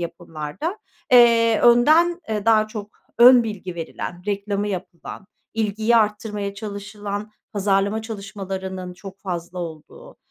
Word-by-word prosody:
yapımlarda, 170 Hz, -, -5 dB, 0.3 s
eee, 230 Hz, -2 st, +6 dB
önden, 310 Hz, +9 st, +5 dB
eee, 210 Hz, -2 st, -2 dB
daha 215 Hz, -1 st, +5 dB
çok 210 Hz, -1 st, -7 dB, 0.3 s
ön 245 Hz, +1 st, +9 dB
bilgi 195 Hz, -5 st, -6 dB
verilen, 175 Hz, +1 st, -6 dB
reklamı 205 Hz, 0 st, -2 dB
yapılan, 185 Hz, 0 st, -7 dB, 0.3 s
ilgiyi 220 Hz, +1 st, +1 dB
arttırmaya 210 Hz, -2 st, -1 dB
çalışılan, 205 Hz, 0 st, -6 dB, 0.2 s
pazarlama 200 Hz, +1 st, +1 dB
çalışmalarının 190 Hz, -4 st, -6 dB
çok 195 Hz, +1 st, -11 dB
fazla 175 Hz, -1 st, -5 dB
olduğu, 175 Hz, -, -9 dB
205 Hz, 110 wpm, -22 LUFS, 190-225 Hz, 0.3 s, ön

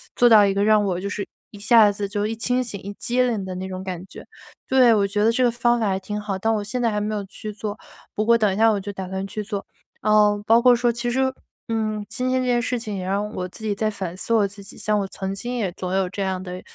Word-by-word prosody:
做 240 Hz, 0 st, +5 dB
到 215 Hz, -2 st, +8 dB
一 195 Hz, -, +1 dB
个 200 Hz, -, +1 dB
让 210 Hz, -1 st, +4 dB
我 185 Hz, -2 st, -1 dB
就 200 Hz, -, -3 dB
是 205 Hz, -1 st, -4 dB, 0.2 s
一 205 Hz, -, -12 dB
下 215 Hz, -1 st, +6 dB
子 200 Hz, 0 st, -4 dB
就 205 Hz, +1 st, -2 dB
一 225 Hz, -, -3 dB
清 250 Hz, +3 st, 0 dB
醒 210 Hz, -5 st, -7 dB
一 200 Hz, +1 st, -7 dB
激 245 Hz, +1 st, -1 dB
灵 225 Hz, -6 st, -1 dB
的 185 Hz, -1 st, -5 dB
那 190 Hz, +1 st, -5 dB
种 185 Hz, 0 st, -6 dB
感 185 Hz, -1 st, -5 dB
觉， -, -, -12 dB, 0.4 s
对， 255 Hz, -3 st, +5 dB
我 200 Hz, -2 st, +2 dB
觉 205 Hz, +1 st, 0 dB
得 225 Hz, -, +4 dB
这 255 Hz, +2 st, +1 dB
个 245 Hz, -, +5 dB
方 240 Hz, 0 st, +1 dB
法 220 Hz, -, +1 dB
还 190 Hz, -1 st, +1 dB
挺 210 Hz, +2 st, -5 dB
好， 200 Hz, -2 st, -3 dB
但 225 Hz, +3 st, +1 dB
我 210 Hz, -, -1 dB
现 245 Hz, +5 st, -4 dB
在 230 Hz, -2 st, +1 dB
还 210 Hz, -, -1 dB
没 215 Hz, +1 st, -2 dB
有 205 Hz, -1 st, -3 dB
去 215 Hz, +2 st, -8 dB
做， 210 Hz, 0 st, -6 dB, 0.3 s
不 215 Hz, -, 0 dB
过 235 Hz, +1 st, +5 dB
等 210 Hz, -4 st, +2 dB
一 -, -, -3 dB
下 225 Hz, +2 st, +5 dB
我 205 Hz, -, 0 dB
就 200 Hz, +1 st, -6 dB
打 190 Hz, -1 st, -6 dB
算 190 Hz, 0 st, -3 dB
去 210 Hz, +2 st, -5 dB
做。 200 Hz, -1 st, -5 dB, 0.4 s
嗯， 210 Hz, -1 st, +4 dB
包 230 Hz, +1 st, +5 dB
括 250 Hz, 0 st, +6 dB
说 240 Hz, 0 st, +2 dB
其 240 Hz, +1 st, -3 dB
实， 260 Hz, +1 st, +1 dB, 0.4 s
嗯， 215 Hz, -2 st, -1 dB
今 250 Hz, +3 st, -3 dB
天 255 Hz, 0 st, +1 dB
这 255 Hz, -, -2 dB
件 240 Hz, -1 st, +2 dB
事 250 Hz, +1 st, -1 dB
情 220 Hz, -3 st, -6 dB
也 185 Hz, -, -4 dB
让 200 Hz, +2 st, -1 dB
我 180 Hz, 0 st, -3 dB
自 220 Hz, -, -13 dB
己 215 Hz, -2 st, 0 dB
在 215 Hz, +2 st, 0 dB
反 190 Hz, -4 st, -5 dB
思 230 Hz, -, -2 dB
我 215 Hz, -3 st, +4 dB
自 200 Hz, +1 st, -8 dB
己， 195 Hz, -, -12 dB
像 210 Hz, -1 st, 0 dB
我 195 Hz, -, -2 dB
曾 190 Hz, 0 st, -5 dB
经 240 Hz, +5 st, -5 dB
也 205 Hz, -7 st, -1 dB
总 180 Hz, 0 st, -5 dB
有 190 Hz, -1 st, +1 dB
这 200 Hz, -, -5 dB
样 190 Hz, -1 st, -2 dB
的， 180 Hz, 0 st, -7 dB
210 Hz, 315 characters per minute, -23 LUFS, 195-230 Hz, 0.4 s, 到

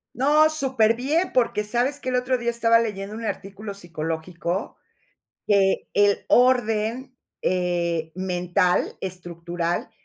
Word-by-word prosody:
No, 300 Hz, +4 st, +4 dB
superbién, 265 Hz, +3 st, +1 dB
porque 230 Hz, -4 st, +1 dB
¿sabes 245 Hz, +7 st, 0 dB
qué? 255 Hz, -, -4 dB
El 250 Hz, -, 0 dB
otro 250 Hz, +1 st, +1 dB
día 235 Hz, 0 st, -2 dB
estaba 230 Hz, -1 st, +3 dB
leyendo 205 Hz, -2 st, -4 dB
un 230 Hz, -, -7 dB
artículo 200 Hz, +1 st, -5 dB
psicológico 170 Hz, +1 st, -4 dB, 0.7 s
que 195 Hz, -2 st, +2 dB
el 205 Hz, 0 st, +3 dB
orden 245 Hz, +1 st, +2 dB, 0.3 s
eh, 170 Hz, -3 st, -1 dB
mental, 180 Hz, 0 st, 0 dB
estructural, 175 Hz, 0 st, -4 dB
210 Hz, 115 wpm, -24 LUFS, 180-245 Hz, 0.7 s, No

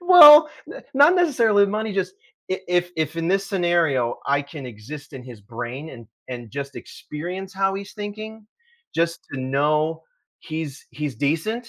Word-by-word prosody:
well, 315 Hz, -4 st, +10 dB, 0.2 s
n -, -, -10 dB
not 290 Hz, +6 st, +6 dB
necessarily 230 Hz, -, +3 dB
money, 215 Hz, +1 st, -2 dB
just, 190 Hz, -1 st, -2 dB, 0.4 s
i -, -, +2 dB
if 190 Hz, -, -8 dB
if 175 Hz, 0 st, +1 dB
if 160 Hz, +1 st, -2 dB
in 165 Hz, +1 st, -2 dB
this 195 Hz, +1 st, +1 dB
scenario, 170 Hz, -, +1 dB
I 140 Hz, +1 st, +1 dB
can 140 Hz, -1 st, -9 dB
exist 135 Hz, +7 st, -10 dB
in 130 Hz, -2 st, -8 dB
his 120 Hz, -4 st, -12 dB
brain 120 Hz, +8 st, -7 dB
and 115 Hz, -4 st, -12 dB, 0.2 s
and 120 Hz, -3 st, -7 dB
just 140 Hz, 0 st, -6 dB
experience 180 Hz, +6 st, -7 dB
how 195 Hz, 0 st, +1 dB
he's 195 Hz, 0 st, -7 dB
thinking, 215 Hz, +1 st, -8 dB, 0.5 s
just 170 Hz, 0 st, 0 dB
to 135 Hz, -, -4 dB
know 150 Hz, +4 st, 0 dB, 0.4 s
he's 155 Hz, -3 st, -6 dB
he's 150 Hz, -4 st, -4 dB
decent, 165 Hz, -, -2 dB
165 Hz, 165 wpm, -22 LUFS, 140-200 Hz, 0.5 s, well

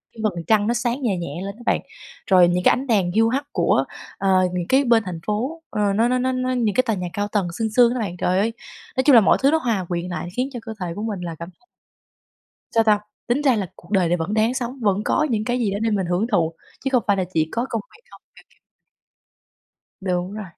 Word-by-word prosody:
cái -, -, -14 dB
vầng 175 Hz, -6 st, -1 dB
trăng 210 Hz, -2 st, +3 dB
nó 235 Hz, -, +2 dB
sáng 240 Hz, +2 st, -1 dB
nhè 215 Hz, -8 st, 0 dB
nhẹ 170 Hz, -1 st, -5 dB
lên 200 Hz, 0 st, -6 dB
á 235 Hz, -, -15 dB
bạn, -, -, +2 dB, 0.5 s
rồi 180 Hz, -2 st, +7 dB
những 180 Hz, +1 st, 0 dB
cái -, -, +6 dB
ánh 265 Hz, +2 st, -3 dB
đèn 195 Hz, -6 st, +2 dB
hiu 225 Hz, +4 st, +3 dB
hắt 275 Hz, +4 st, -1 dB
của, -, -, +2 dB, 0.3 s
ờ, 195 Hz, -, 0 dB, 0.2 s
những 175 Hz, -1 st, -2 dB
cái 270 Hz, +2 st, +4 dB
bên 235 Hz, -4 st, +3 dB
thành 175 Hz, -3 st, -5 dB
phố, 255 Hz, +11 st, -2 dB
ờ, 205 Hz, -2 st, 0 dB
nó 225 Hz, +3 st, +3 dB
nó 250 Hz, +1 st, +1 dB
nó 255 Hz, +1 st, 0 dB
nó 255 Hz, 0 st, -1 dB
những 230 Hz, -5 st, 0 dB
cái 255 Hz, -, +4 dB
tòa 225 Hz, -, 0 dB
nhà 180 Hz, -2 st, -4 dB
cao 205 Hz, 0 st, -1 dB
tầng 200 Hz, -4 st, 0 dB
sương 225 Hz, -1 st, 0 dB
sương 245 Hz, -1 st, +5 dB
á 255 Hz, -, -3 dB
bạn. 190 Hz, -6 st, -3 dB
Trời 180 Hz, +1 st, +1 dB
ơi! 225 Hz, +3 st, 0 dB, 0.4 s
Nói 260 Hz, -, +3 dB
chung 280 Hz, -1 st, +6 dB
là 230 Hz, -, +9 dB
mọi 195 Hz, -, +4 dB
thứ 275 Hz, +1 st, +4 dB
nó 320 Hz, -, +4 dB
hòa 230 Hz, -, -1 dB
quyện 175 Hz, 0 st, -2 dB
lại 175 Hz, -, -4 dB
khiến 255 Hz, +2 st, 0 dB
cho 245 Hz, -, -5 dB
cơ 225 Hz, -, -5 dB
thể 180 Hz, -, -2 dB
của 205 Hz, -, -5 dB
mình 215 Hz, -4 st, -3 dB
là 170 Hz, -2 st, -5 dB
cảm 170 Hz, +1 st, -7 dB
thấy 360 Hz, -, -33 dB, 1.1 s
Sao 225 Hz, -1 st, +4 dB
ta? 210 Hz, -2 st, +4 dB, 0.3 s
Tính 250 Hz, +5 st, +1 dB
ra 265 Hz, -5 st, +3 dB
là 200 Hz, -, -1 dB
cuộc 175 Hz, -, -17 dB
đời 190 Hz, -5 st, +2 dB
này 175 Hz, -, +2 dB
vẫn 180 Hz, +5 st, -3 dB
đáng 220 Hz, +3 st, +2 dB
sống, 255 Hz, +1 st, -4 dB
vẫn 205 Hz, -2 st, +1 dB
có 305 Hz, -, +2 dB
những 215 Hz, -2 st, 0 dB
cái 245 Hz, +2 st, 0 dB
gì 225 Hz, -5 st, 0 dB
đó 200 Hz, -, -2 dB
để 225 Hz, -, +1 dB
mình 195 Hz, -4 st, 0 dB
hưởng 180 Hz, +5 st, 0 dB
thụ, 165 Hz, -4 st, +2 dB, 0.3 s
chứ -, -, +1 dB
không 250 Hz, -3 st, +3 dB
phải 200 Hz, -, +3 dB
là 190 Hz, -, 0 dB
chỉ 160 Hz, -1 st, +2 dB
có 235 Hz, +2 st, -1 dB
công 230 Hz, -, -1 dB, 0.2 s
việc 455 Hz, -, -27 dB
không, -, -, -15 dB
kiểu -, -, -17 dB
kiểu -, -, -30 dB, 1.4 s
Đúng 180 Hz, 0 st, -2 dB
rồi, 215 Hz, 0 st, -6 dB
215 Hz, 270 wpm, -22 LUFS, 185-245 Hz, 1.4 s, là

